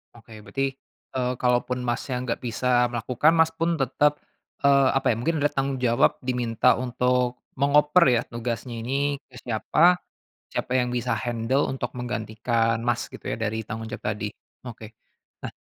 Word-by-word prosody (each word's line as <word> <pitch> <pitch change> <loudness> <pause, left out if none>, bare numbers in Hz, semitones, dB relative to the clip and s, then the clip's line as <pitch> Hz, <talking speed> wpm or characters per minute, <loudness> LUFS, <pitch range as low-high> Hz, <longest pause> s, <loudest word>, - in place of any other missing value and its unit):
Oke, 110 -2 -14
berarti, 135 +2 -1 0.5
eee, 125 0 0
kalaupun 125 0 +1
Masnya 125 +1 -2
nggak 120 -2 -2
bisa 125 +1 +2
melakukan, 125 +6 +2
Mas 160 -1 +4
pun, 165 +1 -1
tetap, 145 +3 +1 0.4
eee, 140 -1 +5
apa 135 - +1
ya, 115 - +3
mungkin 160 +7 0
ada 145 - +3
tanggung 135 -1 -2
jawab 120 -1 +2
diminta 125 -1 +2
untuk 125 0 0 0.2
mengoper 150 +5 +4
ya, 115 - +3
tugasnya 120 0 -4
ini 140 +4 -1
ke 125 - -18
siapa, 150 - +3 0.5
siapa - - -4
yang 125 -1 +1
bisa 125 0 -1
handle 120 +4 0
untuk 125 -2 -4
menggantikan 115 -1 -1
Mas, 120 -1 0
gitu - - -11
ya? - - -2
Dari 110 0 -2
tanggung 110 +1 -6
jawab 110 - -7
tadi, 105 0 -3 0.4
oke. 115 -2 -8 0.6
Nah - - -5
125 Hz, 155 wpm, -25 LUFS, 115-135 Hz, 0.6 s, eee